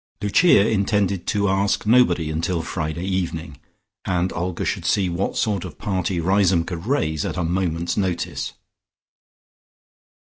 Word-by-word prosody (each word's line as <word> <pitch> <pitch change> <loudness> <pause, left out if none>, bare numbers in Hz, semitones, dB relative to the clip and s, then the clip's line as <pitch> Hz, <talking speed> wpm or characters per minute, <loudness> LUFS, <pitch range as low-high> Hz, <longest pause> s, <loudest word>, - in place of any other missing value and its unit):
Lucia 105 - +4
intended 100 -3 0
to 100 -1 +1
ask 100 +2 +1
nobody 90 -9 +3
until 85 +2 -1
Friday 80 +1 -3
evening, 85 -6 -3 0.4
and 90 0 -1
Olga 90 -1 -3
should - - -2
see 95 -3 +1
what 85 +3 -2
sort 100 -5 0
of - - -9
party 95 -3 -1
Riseholme 90 -1 +2
could 85 +2 -6
raise 80 - 0
at - - -3
a 90 - 0
moment's 85 -1 -1
notice. 95 -4 -2
90 Hz, 135 wpm, -22 LUFS, 85-100 Hz, 0.4 s, Lucia